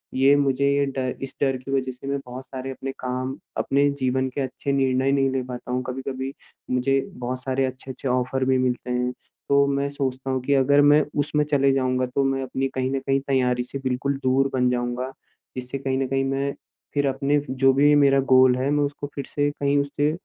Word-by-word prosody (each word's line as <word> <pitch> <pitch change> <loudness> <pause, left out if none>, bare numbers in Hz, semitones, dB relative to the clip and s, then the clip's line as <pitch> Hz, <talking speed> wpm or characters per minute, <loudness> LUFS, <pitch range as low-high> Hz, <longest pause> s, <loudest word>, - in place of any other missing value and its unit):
ये 135 +2 +5
मुझे 140 -1 +2
ये 140 0 +2
डर 130 -1 -1
इस 135 - -7
डर 135 -2 +2
की 130 +2 -8
वज़ह 130 -1 0
से 125 +2 -11
मैं 140 0 -1
बहुत 125 +1 -8
सारे 130 0 -6
अपने 135 +1 -5
काम 130 +1 -3 0.2
अपने 140 +1 +2
जीवन 130 0 0
के 140 - -1
अच्छे 135 +1 -3
निर्णय 135 0 +2
नहीं 135 -1 +2
ले 130 -1 -1
पाता 125 0 -7
हूँ। 125 0 -1
कभी-कभी 130 +1 -4 0.4
मुझे 135 +2 +2 0.2
बहुत 125 +1 -4
सारे 135 0 0
अच्छे-अच्छे 130 +1 -6
ऑफ़र 130 +1 0
भी 130 0 +3
मिलते 125 -1 -1
हैं। 125 0 0 0.4
तो 140 0 +5
मैं 140 0 0
सोचता 135 -2 -3
हूँ 130 - -1
कि 140 - +1
अगर 140 +2 +4
मैं 150 0 +5 0.2
उसमे 150 +1 +1
चले 140 -2 +3
जाऊँगा 130 -1 +1
तो 140 - +3
मैं 135 0 0
अपनी 130 +1 -2
कहीं 130 0 0
न - - 0
कहीं 135 +1 0
तैयारी 125 -2 +1
से 130 +2 -6
बिल्कुल 130 +2 -1
दूर 135 +1 +2
बन 125 -1 +2
जाऊँगा। 125 +1 -2 0.5
जिससे 125 +2 -4
कहीं 135 -1 -1
न 135 - 0
कहीं 135 +1 0
मैं 135 +1 -1 0.4
फिर 145 -1 +1
अपने 140 +2 +1
जो 135 0 +3
भी 145 +2 +5
मेरा 140 -1 +5
गोल 130 -1 +6
है 130 +2 0
मैं 145 0 +2
उसको 145 0 -5
फिर 140 - -4
से 145 0 +2
कहीं 140 0 +2
उससे 145 +1 0
135 Hz, 215 wpm, -24 LUFS, 130-140 Hz, 0.5 s, गोल